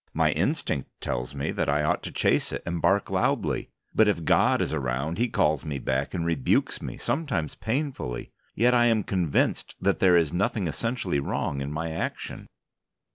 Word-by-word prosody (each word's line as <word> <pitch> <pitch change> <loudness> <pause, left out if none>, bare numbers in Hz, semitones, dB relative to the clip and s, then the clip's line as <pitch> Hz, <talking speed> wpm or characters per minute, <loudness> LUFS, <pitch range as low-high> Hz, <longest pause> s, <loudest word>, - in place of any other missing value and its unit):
My - - +3
instinct 70 - -1
tells 60 +3 -3
me 70 - -2
that - - -1
I 75 +1 +2
ought 75 - +1
to - - -5
chase - - +1
it - - -4
and 85 -1 -2
bark 95 +4 +2
loudly. - - 0 0.2
But 110 - +5
if 90 -6 0
God - - +4
is - - -1
around 70 - -2
He 120 +1 +2
calls 75 -7 +1
me 75 -3 -3
back 70 +5 -1
and 85 -2 -1
rebukes 80 -6 +1
me, - - -6
sometimes 115 - -1
painfully. 125 - -3 0.2
Yet 120 +3 +4
I 120 -1 +5
am 115 -3 +3
convinced 90 -7 0
that 100 +1 +1
there 90 -2 +6
is 80 -3 +2
nothing 100 +2 0
essentially 100 - -1
wrong 70 0 -2
in 70 +1 -4
my 80 +2 -3
action. 80 - -4
85 Hz, 185 wpm, -26 LUFS, 70-105 Hz, 0.2 s, there